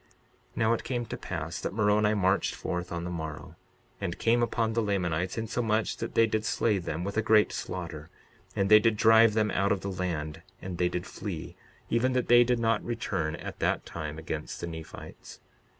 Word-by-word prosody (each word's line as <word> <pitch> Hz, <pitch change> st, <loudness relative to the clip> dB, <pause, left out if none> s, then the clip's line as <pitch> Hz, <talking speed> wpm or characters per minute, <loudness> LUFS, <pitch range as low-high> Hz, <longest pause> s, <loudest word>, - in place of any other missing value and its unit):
62:38 -, -, -18 dB
Now 110 Hz, +1 st, +3 dB
it 115 Hz, -, -2 dB
came 120 Hz, -1 st, -2 dB
to -, -, -5 dB
pass -, -, -5 dB
that -, -, -3 dB
Moroni 105 Hz, 0 st, +3 dB
marched 95 Hz, -1 st, +1 dB
forth 90 Hz, 0 st, -4 dB
on 85 Hz, 0 st, -3 dB
the 90 Hz, -, -4 dB
morrow, 80 Hz, -3 st, -6 dB, 0.5 s
and 85 Hz, -, -3 dB
came 120 Hz, +1 st, +2 dB
upon 115 Hz, -1 st, 0 dB
the 115 Hz, -, +1 dB
Lamanites, 90 Hz, -4 st, -1 dB
insomuch 110 Hz, -1 st, 0 dB
that -, -, -5 dB
they 115 Hz, -, +6 dB
did 110 Hz, -1 st, -1 dB
slay 110 Hz, -2 st, +1 dB
them 85 Hz, -1 st, -4 dB
with 100 Hz, +3 st, -4 dB
a -, -, +4 dB
great 110 Hz, -1 st, +4 dB
slaughter; 85 Hz, -4 st, -5 dB, 0.5 s
and 100 Hz, -, +1 dB
they 105 Hz, +1 st, +8 dB
did 115 Hz, -1 st, +2 dB
drive 110 Hz, 0 st, +6 dB
them 110 Hz, -1 st, +2 dB
out 100 Hz, +2 st, +1 dB
of 100 Hz, -2 st, +1 dB
the 100 Hz, -, -3 dB
land; 80 Hz, -4 st, -3 dB, 0.2 s
and 90 Hz, -2 st, -6 dB
they 90 Hz, 0 st, +3 dB
did 90 Hz, 0 st, -3 dB
flee, -, -, -6 dB, 0.4 s
even 125 Hz, +2 st, +2 dB
that 125 Hz, -1 st, 0 dB
they 120 Hz, 0 st, +8 dB
did 125 Hz, 0 st, +1 dB
not 115 Hz, -2 st, +1 dB
return 85 Hz, -9 st, -2 dB
at -, -, -8 dB
that -, -, 0 dB
time 75 Hz, -2 st, -6 dB
against 80 Hz, -1 st, -5 dB
the -, -, -4 dB
Nephites. 80 Hz, -2 st, -9 dB
100 Hz, 200 wpm, -28 LUFS, 85-115 Hz, 0.5 s, they